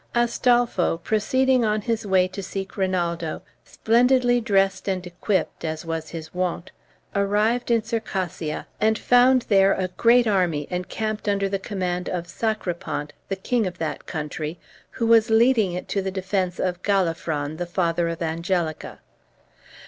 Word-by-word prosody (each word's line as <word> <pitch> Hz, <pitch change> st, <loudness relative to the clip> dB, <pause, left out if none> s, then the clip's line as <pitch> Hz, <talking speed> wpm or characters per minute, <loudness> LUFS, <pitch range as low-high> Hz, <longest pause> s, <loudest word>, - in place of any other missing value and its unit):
Astolpho, 240 Hz, -6 st, +2 dB
proceeding 260 Hz, +4 st, +2 dB
on 215 Hz, -1 st, +1 dB
his 225 Hz, 0 st, -2 dB
way 185 Hz, -1 st, +3 dB
to 195 Hz, +2 st, -6 dB
seek 195 Hz, +1 st, -6 dB
Rinaldo, 175 Hz, -4 st, -1 dB, 0.2 s
splendidly 245 Hz, +1 st, +3 dB
dressed 195 Hz, -3 st, +1 dB
and 185 Hz, -2 st, -1 dB
equipped, 180 Hz, +2 st, -2 dB
as 160 Hz, 0 st, -4 dB
was 165 Hz, -1 st, -4 dB
his 160 Hz, -1 st, -8 dB
wont, 180 Hz, 0 st, -2 dB, 0.4 s
arrived 210 Hz, +5 st, +1 dB
in 230 Hz, -2 st, +3 dB
Circassia, 190 Hz, -8 st, -3 dB
and 220 Hz, +1 st, +2 dB
found 250 Hz, +1 st, +4 dB
there 195 Hz, -1 st, +4 dB
a 185 Hz, -1 st, -2 dB
great 235 Hz, +6 st, +4 dB
army 180 Hz, -8 st, +1 dB
encamped 210 Hz, +4 st, -3 dB
under 200 Hz, -1 st, +1 dB
the 195 Hz, 0 st, -2 dB
command 180 Hz, -3 st, -3 dB
of 175 Hz, -2 st, -3 dB
Sacripant, 175 Hz, -8 st, -3 dB, 0.2 s
the 195 Hz, -, -1 dB
king 220 Hz, +2 st, 0 dB
of 180 Hz, -, -6 dB
that 160 Hz, -1 st, -4 dB
country, 155 Hz, 0 st, -4 dB, 0.3 s
who 230 Hz, -, -3 dB
was 225 Hz, -1 st, +5 dB
leading 220 Hz, -4 st, +4 dB
it 180 Hz, -, -5 dB
to 200 Hz, -, 0 dB
the 190 Hz, -, -2 dB
defence 190 Hz, -1 st, -2 dB
of 180 Hz, -1 st, -1 dB
Galafron, 165 Hz, -6 st, -1 dB
the 175 Hz, 0 st, -3 dB
father 170 Hz, -1 st, 0 dB
of 165 Hz, +1 st, -4 dB
Angelica. 165 Hz, 0 st, -2 dB
190 Hz, 150 wpm, -24 LUFS, 175-220 Hz, 0.4 s, was